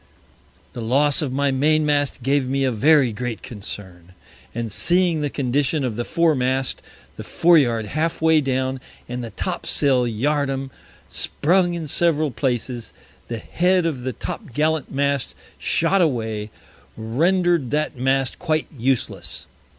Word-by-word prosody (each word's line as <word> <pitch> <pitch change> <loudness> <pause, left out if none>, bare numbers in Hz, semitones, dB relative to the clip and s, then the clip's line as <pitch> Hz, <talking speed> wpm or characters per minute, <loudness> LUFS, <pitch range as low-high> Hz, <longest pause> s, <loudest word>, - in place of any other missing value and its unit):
The 120 - -6
Loss 140 +6 +3
of 145 -4 -2
my 140 +1 +1
Main 155 +3 +2
mast 145 -3 0
gave 135 0 +1
me 135 +1 0
a 130 - +2
very 135 +2 +4
great 120 +1 -5
Concern, 95 -6 -9 0.4
and 115 -2 -3
seeing 170 - +2
the 145 - -1
Condition 140 +2 0
of 120 -4 -3
the 120 - -2
Fore 165 +3 +2
mast, 130 0 0 0.4
the - - -6
Fore 170 -1 +4
yard 115 -5 0
half 155 +9 -2
way 160 -1 +4
down, 130 -1 -1 0.3
and 125 0 -5
the 115 - -5
Top - - -4
sail 130 -3 +3
Yard 140 +5 0
arm 135 0 -4 0.4
sprung 175 +2 +1
in 165 -2 -4
several 155 -1 +1
Places, 120 0 -3 0.3
the 115 - -4
Head 180 +9 +1
of 150 -7 -2
the 130 0 -3
Top 150 - -7
gallant 155 0 0
Mast 140 -1 -1 0.2
shot 180 +4 +2
away, 110 -8 -1 0.5
render'd 165 +6 +1
that 150 +2 -1
Mast 130 +1 0
quite 155 -3 0
useless. 130 0 -2
135 Hz, 150 wpm, -22 LUFS, 125-155 Hz, 0.5 s, very